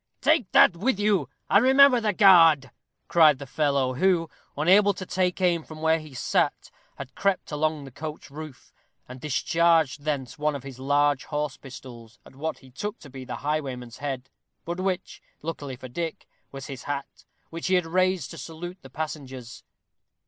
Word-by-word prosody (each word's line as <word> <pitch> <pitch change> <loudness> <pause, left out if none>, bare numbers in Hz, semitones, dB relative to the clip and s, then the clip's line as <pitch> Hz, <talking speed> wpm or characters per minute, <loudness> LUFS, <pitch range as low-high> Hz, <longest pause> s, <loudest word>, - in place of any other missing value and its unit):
"Take 310 - +2
that 175 - +7
with 205 +4 0
you, 205 -2 +1 0.2
and 200 +3 +4
remember 265 -1 +6
the 215 -1 +1
guard," 165 -9 +6 0.4
cried 155 -4 +5
the 140 - -8
fellow, 140 -2 0
who, 170 +2 +1 0.3
unable 195 +6 +4
to 185 - -7
take 180 0 -1
aim 175 -3 +2
from 155 0 -11
where 160 +1 +2
he 155 -4 -12
sat, - - 0 0.2
had 130 - -9
crept 195 -4 -1
along 155 -1 -1
the 135 - -11
coach 150 +2 -8
roof, 155 -2 -10 0.3
and 125 0 -10
discharged 155 +2 +2
thence 145 0 -3
one 150 0 0
of 140 - -7
his 135 -2 -10
large 145 0 +1
horse 150 -2 -3
pistols 120 -3 -12
at - - -16
what 160 +3 -4
he 130 - -16
took 205 - -5
to 140 - -14
be 130 -1 -9
the 125 - -5
highwayman's 130 -6 -3
head, 135 -2 -5 0.3
but 170 +2 -4
which, 185 -1 -3 0.2
luckily 145 -4 -5
for 130 - -10
Dick, 165 +6 -5 0.3
was 135 -1 -8
his 135 -3 -8
hat, 140 -1 -5 0.3
which 165 0 -4
he 185 - +3
had 180 -2 +2
raised 185 +2 0
to - - -9
salute 175 +3 -8
the 135 - -13
passengers. 130 -4 -7
155 Hz, 180 wpm, -26 LUFS, 135-180 Hz, 0.4 s, that